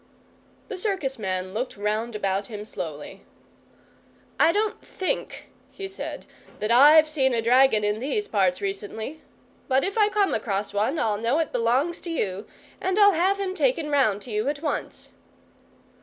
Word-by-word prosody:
The 400 - -6
circus 365 - -1
man 185 -2 -3
looked 245 +1 -4
round 215 +3 -2
about 195 -1 -1
him 210 -2 -7
slowly. 155 -8 -7 1.2
"I 330 - +6
don't 420 +3 -1
THINK," 380 +7 -4 0.2
he 390 - -7
said, 385 - -7 0.3
"that 215 +2 -2
I've 300 +6 +7
seen 265 -5 +1
a 230 - +1
dragon 245 -2 +4
in 210 +1 0
these 415 - -2
parts 190 -4 +1
recently. 205 +8 -5 0.5
But 265 0 +2
if 395 +3 -1
I 420 -1 +5
come 410 -1 +1
across 200 -1 -2
one 215 +10 0
I'll 215 -7 0
know 235 +6 +1
it 325 -2 -1
belongs 255 +8 0
to 345 - -7
you, 205 - -3 0.3
and 375 +1 -1
I'll 405 -1 +6
have 380 +4 +1
him 385 -2 -2
taken 375 -9 0
round 220 -8 +2
to 245 - -9
you 215 +3 -1
at 290 +1 -4
once." 295 - -4
260 Hz, 165 wpm, -25 LUFS, 210-340 Hz, 1.2 s, I've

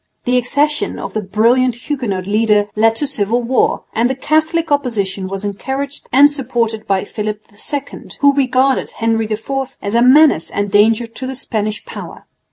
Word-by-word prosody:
The 250 - +1
accession 290 +5 0
of - - -6
the 215 - -1
brilliant 230 +5 +2
Huguenot 240 -8 -3
leader 210 0 +2
led 225 +1 +3
to 290 - +1
civil 240 -3 0
war; 250 +2 +1
and 235 +2 +1
the 265 - -1
Catholic 315 +4 0
opposition 205 -9 -1
was 195 +1 -5
encouraged 270 +8 -5
and 285 +3 +6
supported 235 -5 -2
by 195 -1 +1
Philip 210 0 -5 0.3
II, 285 -1 -5
who 285 -1 +5
regarded 265 -1 +1
Henry 225 -1 0
IV 265 +5 -4
as 200 - -4
a 235 - +3
menace 260 - +5
and 205 -1 -3
danger 220 +3 +3
to 230 +3 -7
the 265 - -5
Spanish 215 -4 -3
power. - - -9
235 Hz, 170 wpm, -16 LUFS, 210-270 Hz, 0.3 s, and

